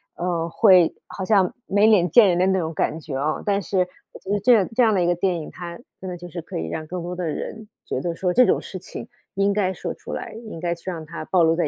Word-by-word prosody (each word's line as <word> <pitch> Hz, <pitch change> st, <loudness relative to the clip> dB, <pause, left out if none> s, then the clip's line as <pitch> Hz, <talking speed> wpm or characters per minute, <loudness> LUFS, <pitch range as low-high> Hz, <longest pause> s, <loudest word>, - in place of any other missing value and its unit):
呃， 170 Hz, -1 st, -2 dB
会 180 Hz, -1 st, +5 dB
好 190 Hz, -, -6 dB
像 195 Hz, -3 st, +3 dB
没 205 Hz, +2 st, +3 dB
脸 185 Hz, -5 st, +4 dB
见 210 Hz, +4 st, +7 dB
人 175 Hz, -, +2 dB
的 185 Hz, -, +3 dB
那 190 Hz, 0 st, +2 dB
种 160 Hz, -1 st, -3 dB
感 155 Hz, +1 st, -1 dB
觉 150 Hz, -3 st, -6 dB
啊。 150 Hz, +3 st, -1 dB
但 200 Hz, -1 st, +1 dB
是 185 Hz, 0 st, 0 dB, 0.3 s
我 -, -, -11 dB
觉 195 Hz, -, -6 dB
得 205 Hz, -, +2 dB
这 250 Hz, +6 st, +4 dB
样 205 Hz, -5 st, +4 dB
这 250 Hz, -, +3 dB
样 220 Hz, -2 st, +4 dB
的 180 Hz, -, +2 dB
一 -, -, +1 dB
个 175 Hz, -, +3 dB
电 175 Hz, -1 st, 0 dB
影， 155 Hz, -, -9 dB
它 170 Hz, -1 st, -8 dB, 0.2 s
真 190 Hz, -, -5 dB
的 180 Hz, -, -5 dB
就 175 Hz, -, -9 dB
是 170 Hz, 0 st, -6 dB
可 -, -, -7 dB
以 80 Hz, -, -3 dB
让 155 Hz, -, -5 dB
更 180 Hz, 0 st, -5 dB
多 175 Hz, +1 st, -5 dB
的 180 Hz, -1 st, -3 dB
人 215 Hz, +7 st, -5 dB, 0.2 s
觉 130 Hz, -, -3 dB
得 170 Hz, +1 st, -2 dB
说 180 Hz, +1 st, 0 dB
这 250 Hz, -, +6 dB
种 -, -, +3 dB
事 -, -, -7 dB
情 -, -, -8 dB, 0.3 s
应 200 Hz, +1 st, +2 dB
该 195 Hz, -2 st, +1 dB
说 -, -, -5 dB
出 -, -, -9 dB
来， -, -, -5 dB, 0.2 s
应 165 Hz, -, -7 dB
该 170 Hz, 0 st, -1 dB
去 170 Hz, +2 st, -7 dB
让 160 Hz, -3 st, -6 dB
它 155 Hz, -, -7 dB
暴 180 Hz, 0 st, +3 dB
露 165 Hz, 0 st, +4 dB
在 170 Hz, -3 st, +1 dB
180 Hz, 310 characters per minute, -23 LUFS, 165-195 Hz, 0.3 s, 见